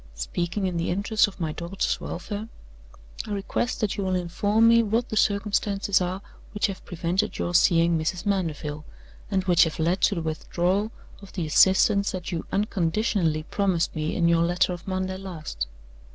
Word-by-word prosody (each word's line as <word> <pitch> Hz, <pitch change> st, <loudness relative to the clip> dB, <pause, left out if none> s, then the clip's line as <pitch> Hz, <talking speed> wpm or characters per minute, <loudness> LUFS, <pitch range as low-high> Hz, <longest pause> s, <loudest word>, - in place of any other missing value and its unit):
Speaking 170 Hz, -, -2 dB
in 180 Hz, -2 st, -1 dB
the 170 Hz, -, -1 dB
interest 205 Hz, +4 st, +2 dB
of 200 Hz, -, -11 dB
my 160 Hz, -3 st, -1 dB
daughter's 170 Hz, +5 st, -2 dB
welfare, 205 Hz, +5 st, -5 dB, 0.8 s
I 210 Hz, -, -3 dB
request 205 Hz, +5 st, -2 dB
that 210 Hz, -1 st, -1 dB
you 200 Hz, -, -1 dB
will 185 Hz, -1 st, 0 dB
inform 205 Hz, +5 st, +2 dB
me 230 Hz, 0 st, +6 dB
what 230 Hz, +3 st, 0 dB
the -, -, -3 dB
circumstances 200 Hz, -1 st, +1 dB
are 185 Hz, +2 st, -3 dB, 0.3 s
which 210 Hz, -, +1 dB
have 195 Hz, -3 st, -4 dB
prevented 180 Hz, +3 st, -1 dB
your 175 Hz, -, -2 dB
seeing 170 Hz, -1 st, +4 dB
Mrs. 170 Hz, +5 st, -2 dB
Mandeville, 155 Hz, -6 st, -2 dB, 0.5 s
and 190 Hz, -1 st, 0 dB
which 180 Hz, -2 st, +5 dB
have 160 Hz, -, -4 dB
led 170 Hz, +4 st, 0 dB
to 205 Hz, -, +3 dB
the 165 Hz, -, -3 dB
withdrawal 180 Hz, +6 st, -1 dB, 0.3 s
of 200 Hz, -, -13 dB
the 175 Hz, -4 st, -2 dB
assistance 195 Hz, +5 st, +4 dB
that 180 Hz, -1 st, -5 dB
you 165 Hz, -2 st, -4 dB
unconditionally 185 Hz, -4 st, 0 dB
promised 185 Hz, -1 st, 0 dB
me 155 Hz, 0 st, -2 dB
in 170 Hz, -, +2 dB
your 170 Hz, 0 st, +3 dB
letter 175 Hz, +2 st, +2 dB
of 175 Hz, +2 st, -9 dB
Monday 185 Hz, 0 st, -2 dB
last. 160 Hz, -, -5 dB
185 Hz, 175 wpm, -25 LUFS, 170-200 Hz, 0.8 s, me